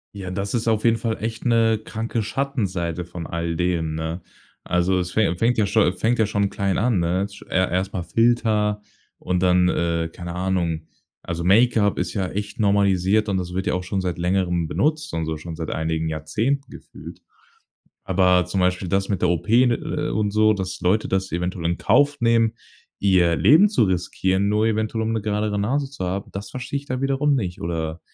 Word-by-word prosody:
Ja, 95 -2 -6
das 100 +2 -3
ist 115 -1 -1
auf 110 -1 +1
jeden 115 -1 +4
Fall 115 -2 -2
echt 115 0 -4
'ne 115 -3 +3
kranke 115 +1 -3
Schattenseite 100 - -2
von 85 -1 -8
all 85 0 -3
dem, 85 -3 -1
ne? 80 +2 -4 0.4
Also, 90 +1 +1
es 90 0 -3
fä 100 -6 +1
fängt 115 +5 +1
ja 110 - +3
scho 100 -2 +3
fängt 115 +6 0
ja 110 - +3
schon 100 -1 0
klein 100 -2 -1
an, 115 -3 +2
ne? 90 +3 0
Sch 100 0 -14
er 90 -2 +1
erst 95 +1 -1
mal 90 - -3
Filter 105 +1 +1 0.3
und 90 0 -2
dann, 90 0 +4
äh, 85 -1 0
keine 90 -1 -7
Ahnung. 90 -4 -1 0.4
Also, 85 0 -4
Make-up 105 +1 +3
ist - - -2
ja 95 -3 -1
echt 105 +3 -5
normalisiert 100 0 +2
und 100 -2 0
das 90 0 -4
wird 95 - -2
ja - - 0
auch 90 0 -2
schon 95 +1 -2
seit 90 -2 -3
Längerem 90 -2 0
benutzt 155 - -1
und 80 -1 -1
so, 80 -1 -3
schon 80 +1 -8
seit 80 -1 -5
einigen 80 0 -1
Jahrzehnten 110 - -2
gefühlt. - - -12 0.8
Aber 90 -2 +3
zum 90 +1 -1
Beispiel 90 0 0
das 95 +2 0
mit 95 -4 -1
der - - +3
OP, 85 +4 -2 0.2
ne, 120 -1 +2
äh, - - -3
und 105 -1 0
so, 110 0 +4
dass 95 -2 -4
Leute 100 +5 +1
das 95 -2 -1
eventuell 90 0 -3
in 85 +1 0
Kauf 145 +4 +2
nehmen, 115 -1 +3 0.5
ihr 90 -4 +3
Leben 165 - +6
zu 205 - +2
riskieren, 95 +1 0
nur 105 +1 +2
eventuell, 110 0 -1
um 110 - -1
'ne 110 -2 -1
geradere 105 -1 -1
Nase 135 +7 -1
zu 95 -9 -5
haben, 95 +2 -4
das 100 0 -6
verstehe 130 +2 -4
ich 140 - -17
dann 130 -1 -3
wiederum 135 +1 +1
nicht 90 -8 -3
oder 80 -1 -3
95 Hz, 205 wpm, -22 LUFS, 90-110 Hz, 0.8 s, Leben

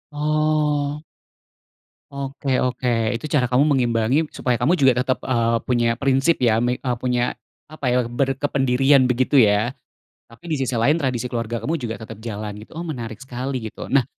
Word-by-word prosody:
Oh. 150 -1 0 1.1
Oke 135 -1 -2
oke. 125 0 -1 0.3
Itu 120 - -5
cara 130 -4 +2
kamu 125 +3 +3
mengimbangi 120 +5 +1
supaya 125 -1 -1
kamu 145 +9 +2
juga 130 -5 +3
tetap, 130 -1 -2
eee, 115 -2 +1
punya 120 -2 +1
prinsip 135 +5 +2
ya, 115 -2 +4
me 120 +1 +1
eee, 125 -1 -2
punya, 125 -1 0 0.4
apa 150 -3 -7
ya, 125 0 +2
berkependirian 135 +1 +2
begitu, 130 +3 +3
ya? 110 +1 +3 0.6
Tapi 115 +9 -15
di 160 - 0
sisi 130 -1 -1
lain 140 +7 +3
tradisi 125 -3 -1
keluarga 115 -1 -3
kamu 150 +9 -2
juga 115 -1 -3
tetap 110 0 -9
jalan 105 -2 -5
gitu. 110 - -15
Oh 170 - -4
menarik 115 -7 -6
sekali 130 0 -4
gitu. - - -9
Nah, 135 -3 +4
125 Hz, 165 wpm, -22 LUFS, 120-140 Hz, 1.1 s, ya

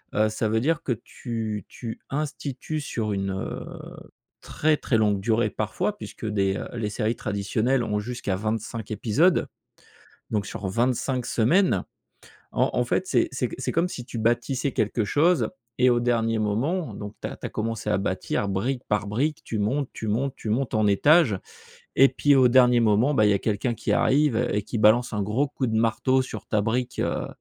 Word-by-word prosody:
heu, 110 +1 +3
ça 110 +1 -1
veut 110 +1 +2
dire 160 +4 +1
que 125 - 0
tu 110 -5 -5
tu 115 -3 -7
institues 145 +1 -3
sur 110 -6 -3
une, 95 0 -2
heu, 95 - -4 0.8
très, 155 0 +1
très 120 - 0
longue 105 -2 +2
durée, 110 +1 +1
parfois, - - -2
puisque - - -8
des 100 -2 +1
heu, - - -5
les 105 -2 -2
séries 110 +2 -1
traditionnelles 110 +5 0
ont 105 -2 -1
jusqu'à 105 -3 -3
25 110 +1 -3
épisodes, 120 - +2 0.8
donc 105 -3 0
sur 95 0 -5
25 125 +4 0
semaines. 170 - +2 0.7
En - - +2
en - - +2
fait, - - 0
c'est - - +2
c'est - - -1
c - - -7
c'est - - -2
comme 170 +2 +1
si 125 - -7
tu 120 - -7
bâtissais 120 +4 0
quelque 110 +1 0
chose 165 - +2 0.3
et 125 0 +5
au 120 0 +3
dernier 115 -2 +1
moment, 135 - -1
donc, 105 0 -7
tu - - -2
as - - -8
tu - - -6
as - - -7
commencé 115 -1 -3
à 90 - +2
bâtir, 100 +1 -2
brique 120 +7 -1
par 105 0 0
brique, 145 +9 -1
tu 110 - -3
montes, 130 +7 0
tu 110 - -6
montes, 130 +5 0
tu 110 - -7
montes 120 +4 -1
en 110 -1 +3
étage 115 - +4 0.6
et 135 0 +7
puis, 145 -1 +3
au 130 -2 +6
dernier 125 -1 +5
moment, 115 +6 +3
bah, 110 -5 +4
il - - +4
y - - +4
a - - +2
quelqu'un 110 +3 -1
qui - - -2
arrive 145 -3 +3 0.2
et 105 - 0
qui 115 - -4
balance 110 +3 +4
un 105 - 0
gros 115 +8 0
coup 130 -2 -2
de 110 -1 -1
marteau 125 +4 +2
sur 110 -4 -8
ta 105 - +1
brique, 125 +3 -2
heu, - - -1
115 Hz, 195 wpm, -25 LUFS, 105-130 Hz, 0.8 s, et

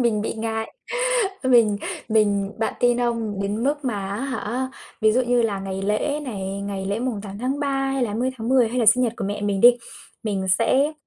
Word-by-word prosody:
mình 230 -4 +2
bị - - -2
ngại, 220 0 -3 0.7
mình 235 -5 +4 0.3
mình 205 -2 +2
bạn 220 - -1
tin 245 0 +3
không? 230 -4 -1
Đến 210 +4 -2
mức 290 0 0
mà 205 -6 -2
á 200 - -2
hả, 260 -1 -3 0.3
ví 215 -1 +4
dụ 255 - +3
như 245 -1 +2
là 205 -4 -1
ngày 195 0 -4
lễ 250 +9 0
này, 195 -5 -4
ngày 200 -1 -4
lễ 200 +3 -1
mùng 240 -4 -2
8/3 255 +8 -3 0.2
hay 270 - 0
là 240 - +1
20/10 245 +1 +1
hay 250 +2 -2
là 230 - +2
sinh 250 +3 +6
nhật 235 -2 +1
của - - -3
mẹ 205 +1 -3
mình 200 -1 0
đi 240 +2 +8 0.5
mình 200 -4 -2
sẽ, 270 +6 +2
225 Hz, 200 wpm, -23 LUFS, 205-250 Hz, 0.7 s, đi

